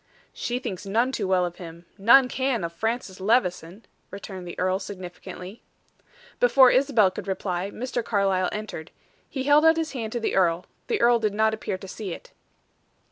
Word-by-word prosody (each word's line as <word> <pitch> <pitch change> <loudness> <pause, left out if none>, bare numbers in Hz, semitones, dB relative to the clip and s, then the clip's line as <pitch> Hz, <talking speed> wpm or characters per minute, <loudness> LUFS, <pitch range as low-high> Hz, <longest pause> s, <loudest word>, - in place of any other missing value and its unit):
"She 245 - -3
thinks 200 -8 -5
none 230 +6 +1
too 210 -7 -2
well 185 -1 +2
of 175 0 -6
him; 170 -1 -10
none 240 +6 +6
can 260 -4 -1
of 170 0 -4
Francis 220 0 -3
Levison," 190 -2 0 0.2
returned 190 -2 -8
the 175 - -8
earl 185 +1 0
significantly. 185 +1 -9 0.8
Before 275 - +6
Isabel 250 -8 +3
could 185 - -8
reply, 190 -1 -2
Mr. 240 +2 -4
Carlyle 195 -4 +1
entered. 210 -6 -6 0.4
He 265 -3 -4
held 290 +2 +5
out 320 0 +5
his 325 -1 -2
hand 225 -5 -5
to 240 - -1
the 225 - -2
earl; 175 -2 +2 0.2
the 450 - 0
earl 240 0 +5
did 215 -2 -1
not 220 +1 +2
appear 210 -3 -3
to 195 - -11
see 195 -1 -6
it. - - -12
205 Hz, 180 wpm, -25 LUFS, 185-240 Hz, 0.8 s, none